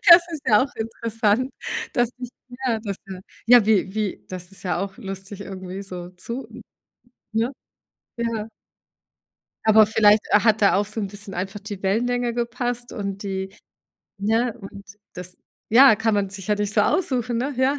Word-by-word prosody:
Das 340 +1 +11
ist 310 -4 -5
ja 215 -2 +5
auch 280 - -11
interessant, 225 +2 0 0.4
dass 240 -1 +1
ich 250 -1 -6 0.4
ja, 230 -3 +1
dass 200 -3 -4
ja 190 -1 -8 0.3
ja, 240 -2 +7
wie 200 -3 +2
wie 215 -3 -2
das 180 -1 -7
ist 195 - -13
ja 180 -3 0
auch 195 0 -4
lustig 195 -2 -7
irgendwie 190 0 -7
so 180 -2 -7
zu 235 +8 -7 0.8
ne, 225 +4 0 0.7
ja. 230 -2 -2 1.2
Aber 220 0 +7
vielleicht 210 0 +5
hat 215 +1 +4
da 200 - +5
auch 205 +1 +2
so 215 +2 -6
'n 205 - -2
bisschen 200 0 -9
einfach 195 +3 -4
die 205 -1 -8
Wellenlänge 240 +4 +1
gepasst 240 0 -3
und 200 -1 -4
die 190 0 -4 0.6
ne, 225 +3 +1
und 200 0 -10 0.3
das 180 0 -9 0.4
ja, 260 0 +9
kann 225 0 +1
man 200 -1 +1
sich 195 -2 -8
ja 210 - +4
nicht 205 0 -2
so 210 - +3
aussuchen, 250 - 0
ne, 270 +4 -2
ja. 260 +3 +2
210 Hz, 170 wpm, -23 LUFS, 195-235 Hz, 1.2 s, Das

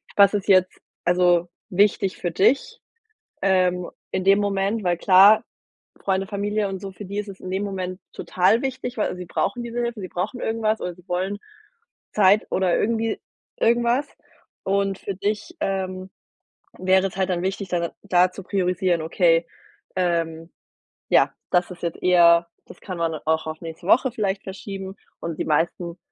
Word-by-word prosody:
was 200 -1 +6
ist 205 -2 -2
jetzt 185 -2 +3 0.3
also 175 -1 +3 0.2
wichtig 195 0 +2
für 175 - -3
dich, 220 +10 +1 0.6
ähm, 180 -2 +2 0.2
in 185 - -1
dem 195 +1 +5
Moment? 200 +2 0
Weil 175 -1 +2
klar, 195 +5 +6 0.6
Freunde, 195 0 0
Familie 205 0 -1
und 190 -1 -5
so, 195 -1 -7
für 195 +3 -9
die 200 +2 -5
ist 210 - -3
es 195 -1 -10
in 185 - -7
dem 190 +2 -1
Moment 185 -2 -4
total 200 +7 +1
wichtig, 260 -2 -4
weil 210 - -1
sie 180 - -7
brauchen 235 +7 -2
diese 235 +1 -4
Hilfe, 235 -1 -2
sie 185 - -5
brauchen 195 +9 -3
irgendwas 220 -1 0
oder 180 - -4
sie 180 +1 -21
wollen 185 +3 -2 0.7
Zeit 205 +1 +4
oder 185 -2 +2
irgendwie 225 0 0 0.4
irgendwas. 235 +4 +2 0.6
Und 195 0 0
für 200 - -5
dich, 210 - -3
ähm, 185 -5 -3 0.7
wäre 190 +1 +3
es 190 - -13
halt 190 - +1
dann 175 -1 -1
wichtig, 190 +1 -3
da 175 -1 0
dann 170 - -2
da 180 -2 +3
zu 195 - -9
priorisieren: 180 -3 0
„Okay, 165 0 +2 0.5
ähm, 165 -2 -1 0.6
ja, - - +4 0.2
das 180 0 +2
ist 180 - -11
jetzt 170 -1 -3
eher 170 -2 +6 0.2
das - - -14
kann 185 -3 -6
man 165 -1 0
auch 160 0 0
auf 155 +1 -6
nächste 165 +2 -8
Woche 255 +3 +4
vielleicht 200 -4 -2
verschieben.“ 195 0 -7 0.3
Und 165 -2 -5
die - - 0
meisten, 170 +3 -1
190 Hz, 170 wpm, -23 LUFS, 180-205 Hz, 0.7 s, was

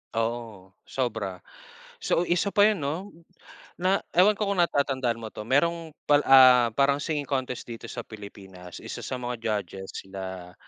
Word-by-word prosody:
Oo, 115 -4 -3 0.2
sobra. 120 -5 -1 0.8
So, 175 - +1
isa 180 +4 +1
pa 205 0 +5
yun, 210 -7 +2
no? 165 +9 -4 0.6
Na 185 +2 +1 0.2
ewan 205 +4 +6
ko 205 0 -2
kung 200 - -1
natatandaan 130 -7 0
mo 110 - -6
to. 105 - -8
Merong 165 +4 +1 0.2
pal 145 0 +5
ah, 125 -3 +7
parang 140 +2 +3
singing 145 -1 -3
contest 130 -3 -3
dito 115 - -8
sa 120 - -6
pilipinas, 95 -5 -11
isa - - -7
sa 130 - -4
mga 125 0 -3
judges 95 -3 -3
sila, 95 -2 -7
125 Hz, 155 wpm, -26 LUFS, 105-160 Hz, 0.8 s, ah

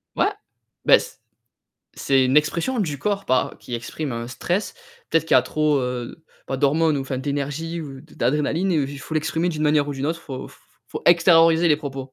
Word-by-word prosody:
Ouais, - - +2 0.6
bah - - +7
c - - -9 0.8
c'est 135 -1 +3
une 130 +3 +1
expression 170 +11 +1
du 155 -10 -1
corps 200 +2 -2
par 130 0 0
qui 120 - -7
exprime 130 +4 -5
un 115 0 -5
stress. 175 - -2 0.4
Peut-être 165 0 +2
qu'il 160 - +1
y - - +9
a - - +2
trop, 155 -2 +1
heu, 125 +5 -5 0.2
pas 135 - -3
d'hormones 150 +2 +2
ou - - -2
enfin 135 0 -4
d'énergie 145 +4 -3
ou 135 -3 -8
d 155 - -19
d'adrénaline 150 +7 0
ou 150 -5 +1
j 140 0 -8
faut 160 - -7
l'exprimer 160 +2 0
d'une 155 -3 -3
manière 150 -1 +2
ou - - -2
d'une 135 0 -4
autre, 165 +2 -2
faut 130 -5 -7
f - - -18 0.3
faut - - -6
extérioriser 165 -1 +5
les 150 - +4
propos. 135 -3 -7
150 Hz, 210 wpm, -22 LUFS, 135-165 Hz, 0.8 s, y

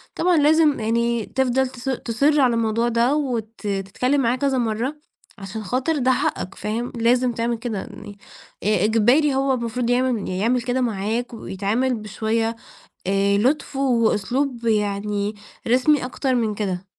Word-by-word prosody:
طبعًا، 350 -1 +2
لازم 300 -1 +4
يعني 235 0 0
تفضل 265 0 +1
تص 255 +1 -6
تُصِر 275 +4 +1
على 250 -3 +4
الموضوع 230 +1 +1
ده، 240 +4 +2
وت 245 -7 -2
تتكلَّم 205 +7 -1
معاه 240 +1 +2
كذا 270 -1 0
مرَّة، 235 +5 -1 0.4
عشان 205 +2 -7
خاطر 260 - -1
ده 260 -1 +2
حقَّك، 195 -6 -1
فاهم؟ 230 +3 -3
لازِم 245 +2 +2
تعمل 230 0 -1
كده 225 -2 -4
يعني، 205 -1 -10 0.5
إ 205 -2 +2
إجباري، 245 +7 +3
هو 270 0 +2
المفروض 235 0 -2
يعمل 245 -3 +1
يعمل 225 +7 +1
كده 250 +2 -1
معاك، 230 +2 -2
ويتعامل 220 +5 -1
بشوية 225 +1 -2 0.5
آآ، 200 +1 +2
لطف 270 +6 0
وأسلوب 245 0 0
يعني، 210 -1 0 0.3
رسمي 255 +4 +3
أكتر 260 0 -1
من 220 -3 0
كده. 190 -3 -3
235 Hz, 145 wpm, -22 LUFS, 215-260 Hz, 0.5 s, لازم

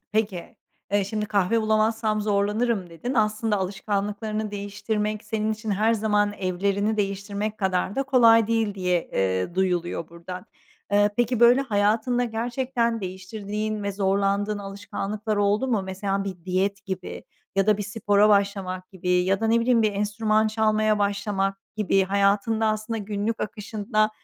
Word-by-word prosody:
Peki, 205 -5 -2 0.4
eee, 205 -1 +3
şimdi, 210 +1 -3
"Kahve 205 +2 +2
bulamazsam 215 0 +1
zorlanırım." 205 -1 0
dedin; 240 +11 -4
aslında 215 -1 +1
alışkanlıklarını 205 +2 -2
değiştirmek 210 +1 -3
senin 220 0 -1
için 215 0 -5
her 215 +3 +2
zaman 210 -1 +1
evlerini 200 +3 -1
değiştirmek 200 +1 -2
kadar 190 +1 0
da 275 - +2
kolay 230 -5 +5
değil 225 -3 0
diye, 180 -3 0
eee, 95 - 0
duyuluyor 175 -3 -1
buradan. 170 +2 -9 0.5
Eee, 205 0 +4
peki, 240 0 +1
böyle 240 +3 +7
hayatında 225 +1 +1
gerçekten 235 0 -1
değiştirdiğin 205 +3 -4
ve 200 0 -2
zorlandığın 200 +1 0
alışkanlıklar 205 +2 -4
oldu 205 +5 +1
mu? 220 -5 +1
Mesela 195 +1 -2
bir 185 -4 -7
diyet 195 +2 -1
gibi 190 -2 -6 0.3
ya 195 - +3
da 215 -1 +4
bir 205 - -1
spora 205 0 +2
başlamak 195 -2 0
gibi 180 -1 -7
ya 180 +2 +2
da, 225 - +1
ne 230 +1 +3
bileyim, 230 -1 +3
bir 215 - +2
enstrüman 215 +2 +1
çalmaya 215 -1 +2
başlamak 200 -1 -1 0.2
gibi. 195 -2 +2
Hayatında 200 +3 +2
aslında 215 +1 -1
günlük 210 +2 -3
akışında 215 0 -1
205 Hz, 145 wpm, -25 LUFS, 195-220 Hz, 0.5 s, böyle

